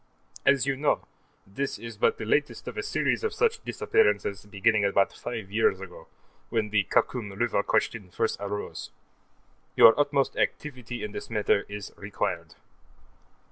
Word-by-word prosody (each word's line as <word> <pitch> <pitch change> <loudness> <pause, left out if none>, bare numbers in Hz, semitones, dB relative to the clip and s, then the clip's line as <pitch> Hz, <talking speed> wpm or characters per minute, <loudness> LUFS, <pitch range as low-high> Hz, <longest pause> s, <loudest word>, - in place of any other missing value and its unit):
As 140 -2 +5
you 140 -1 +1
know, 145 +2 0 0.4
this 135 +9 -3
is 115 -1 -8
but 105 - +2
the 110 - -5
latest 145 +7 0
of - - -5
a 415 - -2
series 410 - 0
of 445 - -1
such 460 -1 +1
disappearances, 420 - +1
beginning 105 +1 +2
about 100 0 +2
five 110 -5 -6
years 105 -3 +2
ago, 95 -2 -10 0.4
when 110 -3 -1
the 105 -2 +2
Khakum 110 -6 0
River 115 -2 +1
question 100 -2 -1
first 110 +5 -1
arose. 100 0 -5 0.9
Your 115 - +9
utmost 145 -1 +2
activity 125 -5 -3
in 105 - -4
this - - -7
matter 105 -2 +1
is 105 -1 -7
required. 100 0 -3
110 Hz, 150 wpm, -27 LUFS, 100-135 Hz, 0.9 s, Your